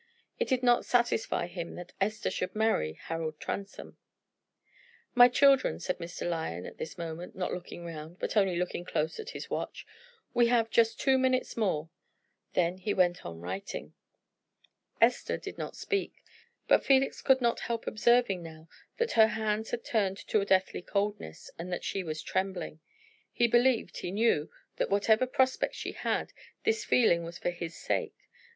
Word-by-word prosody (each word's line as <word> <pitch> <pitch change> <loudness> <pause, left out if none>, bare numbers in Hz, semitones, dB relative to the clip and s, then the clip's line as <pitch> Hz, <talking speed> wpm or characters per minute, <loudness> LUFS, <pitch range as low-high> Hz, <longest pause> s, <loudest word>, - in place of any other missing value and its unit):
It - - +1
did 260 -2 +1
not 240 -1 +4
satisfy 240 -5 +1
him 170 -1 -6
that 175 0 -9
Esther 215 +2 0
should 185 - -3
marry 215 - +1
Harold 160 - -5
Transome. 200 0 -6 1.2
"My 245 -1 +9
children," 275 +1 +4
said 180 +1 -3
Mr. 175 +1 -5
Lyon 160 - -3
at - - -10
this - - -6
moment, 170 +1 -6
not 185 -1 -2
looking 175 -1 -7
round, 160 +1 -8
but - - -3
only 195 -4 +3
looking 175 0 -2
close 160 -2 -2
at - - -6
his - - -7
watch, - - -4 0.5
"we 240 -1 +4
have 230 -2 +2
just 225 -1 +3
two 265 -1 +3
minutes 260 0 +1
more." 165 -8 -1 0.6
Then 180 +1 +1
he 205 +2 -1
went 180 -1 +2
on 85 -1 -8
writing. 190 - -5 1.1
Esther - - +3
did - - -8
not - - -5
speak, 400 -1 -3 0.4
but - - +5
Felix 270 0 +3
could 265 -1 +4
not 235 -2 +1
help 230 -1 -3
observing 220 -4 +3
now 160 -1 -11 0.3
that 470 -1 0
her 220 -1 +6
hands 220 0 -1
had 235 - -3
turned 195 -4 +1
to 215 - +3
a - - -1
deathly 190 -2 +2
coldness, 200 - -3
and 175 +2 -5
that 175 - -3
she 195 - -2
was 155 -2 -5
trembling. 185 -4 -2 0.5
He 240 - +2
believed, 240 +1 +2
he - - -4
knew, 200 -6 +2 0.3
that - - 0
whatever 220 +5 +3
prospects 260 0 +1
she - - -4
had, - - -2 0.3
this 445 -1 +1
feeling 170 -9 +3
was 170 +1 -7
for 175 - -1
his 170 -1 -6
sake. - - -2
195 Hz, 170 wpm, -30 LUFS, 170-235 Hz, 1.2 s, My